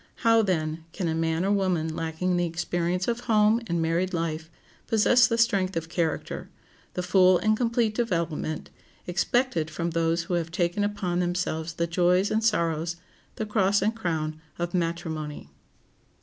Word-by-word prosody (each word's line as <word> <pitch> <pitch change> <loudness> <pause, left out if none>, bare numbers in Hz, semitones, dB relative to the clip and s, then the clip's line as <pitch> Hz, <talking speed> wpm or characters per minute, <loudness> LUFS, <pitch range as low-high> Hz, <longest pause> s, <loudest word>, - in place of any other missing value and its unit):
How, 230 0 +6
then, 160 -5 -1
can 180 - -2
a 160 - 0
man 165 +2 0
or 200 - +1
woman 180 -5 0
lacking 165 +3 -1
the 175 0 +1
experience 175 +2 -1
of 235 0 0
home 215 +1 +4
and 170 -2 0
married 175 +3 0
life 160 -1 -3 0.4
possess 240 +3 +5
the 230 -2 0
strength 195 -6 +2
of 165 0 -4
character, 165 -2 -2 0.5
the 180 - -2
full 185 0 +5
and 215 +4 +2
complete 230 -1 +1
development, 170 -8 -2 0.3
expected 175 -1 0
from 170 +2 -3
those 165 0 +1
who 175 - -4
have 170 -1 0
taken 175 +3 0
upon 195 -4 -1
themselves 175 -2 -1
the 170 +1 -1
joys 180 +3 +2
and 220 +1 +1
sorrows, 170 -5 +1 0.4
the 220 - -3
cross 205 -2 +2
and 220 +2 +1
crown 155 -6 -3 0.2
of 175 0 -3
matrimony? 165 -4 -3
175 Hz, 160 wpm, -26 LUFS, 165-205 Hz, 0.5 s, How